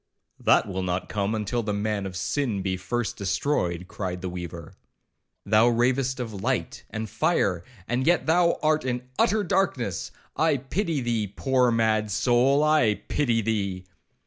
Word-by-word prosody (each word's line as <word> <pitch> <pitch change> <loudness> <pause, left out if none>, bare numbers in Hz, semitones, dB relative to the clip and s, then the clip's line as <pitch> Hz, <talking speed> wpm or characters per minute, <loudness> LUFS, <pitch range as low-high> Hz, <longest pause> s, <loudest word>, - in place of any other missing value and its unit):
'—'That - - +3
will 95 -1 -3
not 90 0 -2
come 105 +1 -1
till 120 +4 -1
the 105 -2 -2
Man 100 -1 -1
of 95 - -8
Sin 110 -1 -1
be 95 -1 -1
first 110 +5 -3
destroyed,' 90 - -1
cried 90 -3 -5
the 90 - -2
weaver; 85 -2 -7 0.7
'thou 110 +3 +4
ravest 125 +2 +1
of 115 -3 -4
light - - -2
and 110 0 -4
fire, 110 - +1 0.2
and 125 +3 -1
yet 175 +1 +3
thou 170 +1 +3
art 155 -1 +2
in 125 -1 -2 0.2
utter 210 +2 +3
darkness.—I 160 - -1
pity 155 - -2
thee, 115 -3 -1
poor 125 +5 +1
mad 110 -2 +1
soul, 125 +7 +3
I 150 -9 +4
pity 120 -6 +1
thee!' 100 -4 -2
115 Hz, 150 wpm, -26 LUFS, 100-135 Hz, 0.7 s, thou